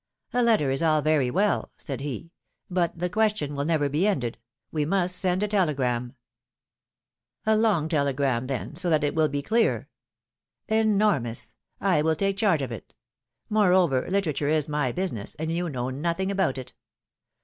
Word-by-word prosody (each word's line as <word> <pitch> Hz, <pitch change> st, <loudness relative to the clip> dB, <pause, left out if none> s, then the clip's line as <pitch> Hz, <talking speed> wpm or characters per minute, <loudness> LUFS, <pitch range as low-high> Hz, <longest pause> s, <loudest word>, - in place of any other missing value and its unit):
^^A 245 Hz, 0 st, +2 dB
letter 215 Hz, -, +3 dB
is 135 Hz, -, -1 dB
all 155 Hz, -2 st, +3 dB
very 155 Hz, -5 st, +2 dB
well,^^ 200 Hz, +9 st, +1 dB
said 135 Hz, -3 st, -6 dB
he; 145 Hz, +3 st, -5 dB, 0.4 s
but 175 Hz, -2 st, 0 dB
the 180 Hz, +2 st, -1 dB
question 210 Hz, -7 st, 0 dB
will 140 Hz, 0 st, -2 dB
never 155 Hz, -3 st, +1 dB
be 155 Hz, +8 st, +1 dB
ended 125 Hz, -, -1 dB, 0.2 s
— -, -, -58 dB
we 155 Hz, -2 st, 0 dB
must 180 Hz, +2 st, +1 dB
send 185 Hz, +1 st, +1 dB
a -, -, +1 dB
telegram.'^ 135 Hz, -, 0 dB, 1.3 s
^^A 220 Hz, 0 st, +4 dB
long 200 Hz, -9 st, +2 dB
telegram, 140 Hz, -5 st, 0 dB
then, 135 Hz, +3 st, -4 dB
so 175 Hz, +2 st, -1 dB
that 155 Hz, -2 st, +2 dB
it 145 Hz, -, 0 dB
will 155 Hz, -1 st, +3 dB
be 145 Hz, -1 st, -3 dB
clear.'^ 225 Hz, +7 st, +1 dB, 0.9 s
Enormous! 195 Hz, -, +1 dB, 0.3 s
I 185 Hz, -6 st, +2 dB
will 160 Hz, +1 st, +2 dB
take 195 Hz, +3 st, 0 dB
charge 190 Hz, -9 st, +2 dB
of 130 Hz, -, -4 dB
it; 115 Hz, -, -9 dB, 0.5 s
moreover 180 Hz, -10 st, +3 dB
litera 190 Hz, -5 st, +1 dB
ture 145 Hz, +1 st, -1 dB
is 155 Hz, -1 st, +1 dB
my 150 Hz, -4 st, 0 dB
business, 120 Hz, -, -3 dB
and 160 Hz, +2 st, -3 dB
you 175 Hz, +1 st, -1 dB
know 130 Hz, -2 st, -3 dB
nothing 170 Hz, +7 st, -1 dB
about 190 Hz, -9 st, 0 dB
it. 130 Hz, -1 st, -8 dB
155 Hz, 170 wpm, -26 LUFS, 140-190 Hz, 1.3 s, ^^A